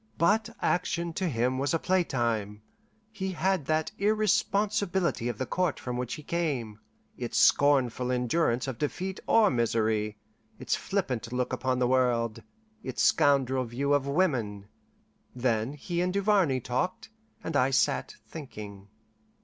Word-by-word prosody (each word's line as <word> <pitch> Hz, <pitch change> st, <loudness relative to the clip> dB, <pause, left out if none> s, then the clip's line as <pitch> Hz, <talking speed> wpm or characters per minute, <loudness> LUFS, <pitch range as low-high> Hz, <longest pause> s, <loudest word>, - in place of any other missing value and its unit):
But 205 Hz, +5 st, +2 dB
action 170 Hz, -1 st, 0 dB
to 185 Hz, +1 st, -1 dB
him 125 Hz, 0 st, 0 dB
was 140 Hz, +4 st, +1 dB
a -, -, +3 dB
playtime; 115 Hz, -, -1 dB, 0.5 s
he 190 Hz, -3 st, -4 dB
had 185 Hz, -2 st, 0 dB
that 155 Hz, 0 st, 0 dB
irresponsibility 200 Hz, -, +1 dB
of 120 Hz, -, -4 dB
the 130 Hz, -, -2 dB
Court 180 Hz, -1 st, -1 dB
from 125 Hz, -1 st, -4 dB
which 125 Hz, -1 st, -3 dB
he 150 Hz, -, -10 dB
came, 140 Hz, -11 st, -2 dB, 0.4 s
its -, -, -3 dB
scornful 130 Hz, -3 st, +3 dB
endurance 125 Hz, +1 st, +1 dB
of 130 Hz, -4 st, -5 dB
defeat 185 Hz, +6 st, -3 dB
or 225 Hz, -2 st, +5 dB
misery, 110 Hz, -3 st, 0 dB, 0.4 s
its 130 Hz, -1 st, -1 dB
flippant 130 Hz, -, -2 dB
look 125 Hz, 0 st, -1 dB
upon 130 Hz, -1 st, 0 dB
the 125 Hz, -1 st, +2 dB
world, 120 Hz, -3 st, +1 dB, 0.4 s
its -, -, -2 dB
scoundrel 135 Hz, -4 st, +3 dB
view 130 Hz, +4 st, -1 dB
of 140 Hz, -1 st, +1 dB
women. 120 Hz, -, 0 dB, 0.7 s
Then 120 Hz, 0 st, 0 dB
he 170 Hz, +4 st, -3 dB
and 180 Hz, 0 st, 0 dB
Duvarney 195 Hz, -9 st, +2 dB
talked, 130 Hz, -, -3 dB, 0.3 s
and 165 Hz, -, -4 dB
I 130 Hz, -1 st, +4 dB
sat 135 Hz, -, +1 dB
thinking. 105 Hz, -10 st, -9 dB
135 Hz, 140 wpm, -28 LUFS, 120-175 Hz, 0.7 s, or